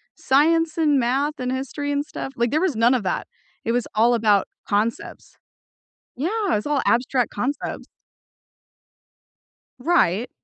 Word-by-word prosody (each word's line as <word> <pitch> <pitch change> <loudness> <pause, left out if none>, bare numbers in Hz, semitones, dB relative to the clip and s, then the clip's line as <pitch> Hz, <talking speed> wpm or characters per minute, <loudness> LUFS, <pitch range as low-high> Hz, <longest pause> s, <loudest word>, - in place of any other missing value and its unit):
science 315 +4 +2
and 300 -4 +3
math 270 +5 0
and 250 0 -2
history 275 +2 -3
and 285 0 -1
stuff, 270 -3 -7
like 235 -1 0
there 310 - +1
was 365 -8 +1
none 230 +3 +4
of 255 - +1
that. 185 - -2 0.4
It 230 - 0
was 245 0 0
all 230 +3 +4
about 210 -4 +3 0.2
concepts 215 +3 -2 0.8
Yeah, 390 - 0
it's 210 - -4
all 290 -2 +1
abstract 245 0 +1
concepts. 260 +7 -4 1.9
Right 245 - +2
260 Hz, 140 wpm, -22 LUFS, 235-295 Hz, 1.9 s, none